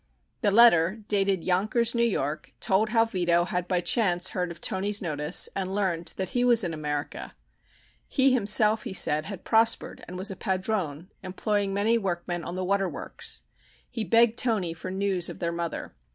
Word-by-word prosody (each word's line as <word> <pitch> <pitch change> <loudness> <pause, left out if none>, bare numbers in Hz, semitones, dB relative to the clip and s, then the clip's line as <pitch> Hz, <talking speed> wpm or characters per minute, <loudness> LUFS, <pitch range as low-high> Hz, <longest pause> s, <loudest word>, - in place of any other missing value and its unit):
The 205 - +3
letter, 205 -2 +5
dated 195 -4 +1
Yonkers, 215 +6 +1
New 235 - 0
York, 155 -10 -2
told 210 +1 +2
how 225 0 +3
Vito 175 -5 +1
had 180 0 -3
by 180 -1 +1
chance 180 -2 +1
heard 180 -1 -3
of 170 -1 -9
Toni's 200 +4 -1
notice 150 -2 +1
and 190 0 -3
learned 180 -5 -2
that 190 -2 -2
he 245 - 0
was 240 -3 +5
in 170 -2 -2
America. 150 -2 -5 0.7
He 270 -1 +3
himself, 215 -1 +3
he 230 -7 -6
said, 155 -4 +1
had 195 -1 -8
prospered 225 0 +2
and 180 - -7
was 190 +3 -2
a - - -6
padrone, 185 -5 -2
employing 200 +2 -2
many 215 +4 +2
workmen 175 -3 -3
on 175 - -6
the 185 0 -3
water 195 0 +1
works. - - -3 0.5
He 235 -3 -3
begged 230 +4 +3
Toni 205 -9 0
for 170 +3 -8
news 190 -2 -1
of - - -8
their 170 -1 -2
mother. 170 -1 -5
190 Hz, 180 wpm, -26 LUFS, 175-215 Hz, 0.7 s, letter